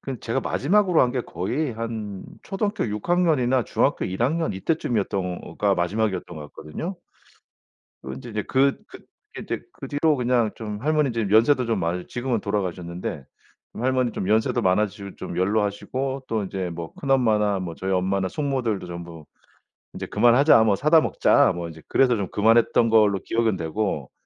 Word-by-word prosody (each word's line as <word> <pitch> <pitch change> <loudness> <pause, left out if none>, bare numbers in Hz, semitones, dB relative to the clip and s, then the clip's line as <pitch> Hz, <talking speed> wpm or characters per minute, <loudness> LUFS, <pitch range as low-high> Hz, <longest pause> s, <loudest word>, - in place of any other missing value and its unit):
그 135 -3 -6
제가 120 +4 -1
마지막으로 185 +5 +2
한 125 - +2
게 125 - -1
거의 125 - -3
한 110 -3 -5 0.2
초등학교 205 - -2
6 105 +5 -5
학년이나 145 - +2
중학교 - - 0
1 95 +5 -3
학년 160 +6 0
이때쯤이었던가 100 - -1
마지막이었던 90 -1 -1
것 75 -1 -9
같거든요. 160 - -6 1.1
그 65 - -7
인제 65 - -9
이제 105 -1 -2
그 135 +1 +2
그 - - -11 0.4
이제 - - -4
그 - - -9
뒤로 150 +1 +2
그냥 120 -3 +1
좀 105 -2 -5
할머니 150 -2 +2
이제 115 -2 -1
연세도 120 +4 +4
좀 115 -3 0
많으 85 +1 -2
지금은 120 -2 -2
돌아가셨는데 90 -7 -4 0.5
할머니 130 0 0
좀 95 - -3
연세도 110 +1 +2
많아지시고 100 +1 0
좀 - - -7
연로하시고 110 +8 -1
또 110 -3 -1
이제 95 -2 -4
뭐 85 -1 -7
큰엄마나 110 -7 +2
뭐 85 -3 -5
저희 95 +3 -3
엄마나 95 +1 0
숙모들도 130 -7 -2
전부 85 -3 -9 0.7
"이제 - - -5
그만하자. 120 +3 +5
뭐 105 -3 +3
사다 155 +7 +4
먹자." - - +3
뭐 85 -1 -5
이제 80 -1 -12
그래서 125 -3 +3
좀 100 -3 -2
그만했던 115 +2 +3
걸로 105 -3 +4
기억은 115 -2 +1
되고 80 -4 -3
110 Hz, 360 characters per minute, -24 LUFS, 95-130 Hz, 1.1 s, 그만하자